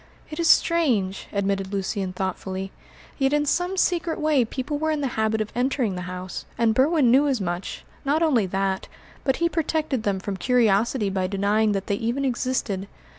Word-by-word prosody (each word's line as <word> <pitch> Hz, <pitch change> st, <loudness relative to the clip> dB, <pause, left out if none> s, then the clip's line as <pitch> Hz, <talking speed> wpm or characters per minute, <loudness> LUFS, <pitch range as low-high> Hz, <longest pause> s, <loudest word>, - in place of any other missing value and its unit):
"It 305 Hz, -, -6 dB
is 335 Hz, -1 st, +2 dB
strange," 235 Hz, -, +2 dB
admitted 195 Hz, -1 st, -1 dB
Lucian 195 Hz, -1 st, -2 dB
thoughtfully, 190 Hz, +1 st, -4 dB, 0.5 s
"yet 270 Hz, +1 st, +2 dB
in 295 Hz, 0 st, +2 dB
some 355 Hz, +5 st, 0 dB
secret 345 Hz, -3 st, +1 dB
way 305 Hz, -4 st, +3 dB
people 260 Hz, +5 st, -4 dB
were 315 Hz, +1 st, 0 dB
in 305 Hz, -2 st, 0 dB
the 275 Hz, -, 0 dB
habit 220 Hz, 0 st, +1 dB
of 215 Hz, -, -4 dB
entering 245 Hz, -4 st, 0 dB
the 180 Hz, -, -4 dB
house, 185 Hz, 0 st, -6 dB
and 230 Hz, -1 st, +3 dB
Berwin 270 Hz, 0 st, +4 dB
knew 275 Hz, +4 st, +5 dB
as 265 Hz, -4 st, +1 dB
much; 180 Hz, -1 st, -4 dB, 0.2 s
not 295 Hz, +4 st, +2 dB
only 250 Hz, -11 st, +3 dB
that, 190 Hz, 0 st, -1 dB, 0.4 s
but 265 Hz, -1 st, +2 dB
he 335 Hz, -, +1 dB
protected 310 Hz, -5 st, -1 dB
them 200 Hz, -3 st, -1 dB
from 195 Hz, 0 st, -4 dB
curiosity 225 Hz, 0 st, +2 dB
by 190 Hz, -1 st, 0 dB
denying 205 Hz, +2 st, +1 dB
that 195 Hz, -1 st, -2 dB
they 200 Hz, -, -1 dB
even 240 Hz, +6 st, -1 dB
existed." 240 Hz, -6 st, -1 dB
230 Hz, 180 wpm, -24 LUFS, 195-290 Hz, 0.5 s, knew